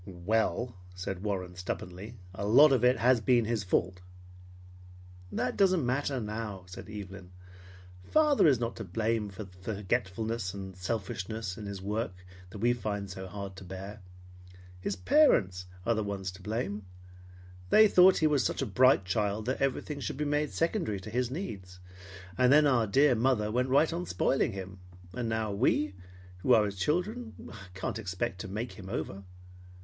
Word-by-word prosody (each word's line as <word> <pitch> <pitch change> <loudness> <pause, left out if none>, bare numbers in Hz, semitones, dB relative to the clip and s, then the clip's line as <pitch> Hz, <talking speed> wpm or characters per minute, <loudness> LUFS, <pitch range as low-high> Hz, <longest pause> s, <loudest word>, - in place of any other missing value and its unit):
"Well, 110 +6 -1
" 90 0 -19
said 95 0 -5
Warren 95 -3 -3
stubbornly, 95 +4 -6 0.2
"a 95 - -5
lot 140 +7 +7
of 130 -3 +2
it 125 +1 +5
has 125 -1 +4
been 120 +1 +3
his 110 -2 -1
fault." 90 0 0 1.3
"That 125 - -1
doesn't 185 -7 +3
matter 135 +2 0
now," 105 -3 -5
said 90 +3 -10
Evelyn. 100 -3 -8 0.7
"Father 300 - +4
is 135 -6 +4
not 115 -1 -2
to 115 - -5
blame 110 +3 -1
for 100 +2 -7
the 95 - -14 0.2
forgetfulness 100 +1 -2
and 95 -1 -7
selfishness 95 +1 -4
in 105 0 -7
his 100 -1 -6
work 105 -1 -2 0.3
that 95 - -9
we 120 +4 +2
find 100 -4 -4
so 95 0 -7
hard 100 0 -7
to 95 - -9
bear. 95 +3 -8 0.8
His 95 +2 -2
parents 90 - +3 0.2
are 115 - +3
the 110 -1 -1
ones 100 -2 -4
to 90 +1 -13
blame. 105 0 -3 0.9
They 215 - +7
thought 185 -1 +7
because - - -1
he - - +4
was 150 -3 +3
such - - -1
a - - -1
bright 130 -6 +4
child 105 +3 -1
that 130 +2 -2
everything 135 +2 -1
should 135 - -4
be 150 - -1
made 150 0 0
secondary 165 - -1
to 105 +3 -9
his 125 +1 0
needs. 100 - -6 0.6
And 125 0 +5
then 150 +1 +7
our 125 -6 +3
dear 135 +6 +4
mother 115 -3 +1
went 125 +3 0
right 150 +5 +4
on 175 +1 -3
spoiling 135 - +1
him. 95 -1 -7 0.3
So 125 - -4
now 110 -2 -1
we, 100 -2 +1 0.5
who 125 +7 +3
are 110 - +4
his 100 -2 -5
children, 205 - -2 0.2
can't 95 +3 -3
expect 95 0 -3
to - - -6
make 110 +6 -4
him 95 -3 -10
over. 100 0 -4
110 Hz, 175 wpm, -30 LUFS, 95-125 Hz, 1.3 s, lot